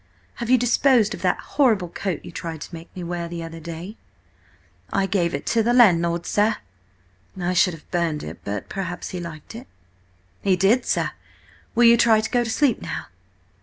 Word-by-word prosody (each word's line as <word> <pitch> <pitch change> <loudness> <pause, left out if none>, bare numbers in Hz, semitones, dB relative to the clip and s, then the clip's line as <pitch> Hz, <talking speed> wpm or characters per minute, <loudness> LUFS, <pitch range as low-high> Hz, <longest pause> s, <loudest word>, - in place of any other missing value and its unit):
"Have 235 -1 -4
you 255 - +6
disposed 245 -2 +3
of - - -8
that - - +2
horrible 225 -11 +1
coat 185 -1 -4
you - - -8
tried 165 -2 -6
to - - -9
make 165 0 -9
me 180 - -6
wear 170 0 -3
the 170 0 -6
other 165 0 -8
day?" 170 +6 -8 0.9
"I 195 - +1
gave 180 -3 0
it - - -5
to 230 - +3
the 235 +2 +2
landlord, 170 -7 +4
sir." 215 +2 +2 0.8
"I 180 0 0
should 180 -1 +3
have 155 - -18
burned 170 -4 -1
it, - - -8
but 100 0 -4
perhaps 180 -2 -5
he 180 - -5
liked 165 -1 -8
it." 240 +4 -9 0.7
"He 195 -2 +3
did, 200 +7 +2
sir. - - 0 0.6
Will 240 - +4
you 235 0 +7
try 225 -2 +5
to 220 0 -2
go 245 -1 +2
to 230 - -4
sleep 265 +1 +2
now?" - - -5
185 Hz, 195 wpm, -23 LUFS, 170-230 Hz, 0.9 s, you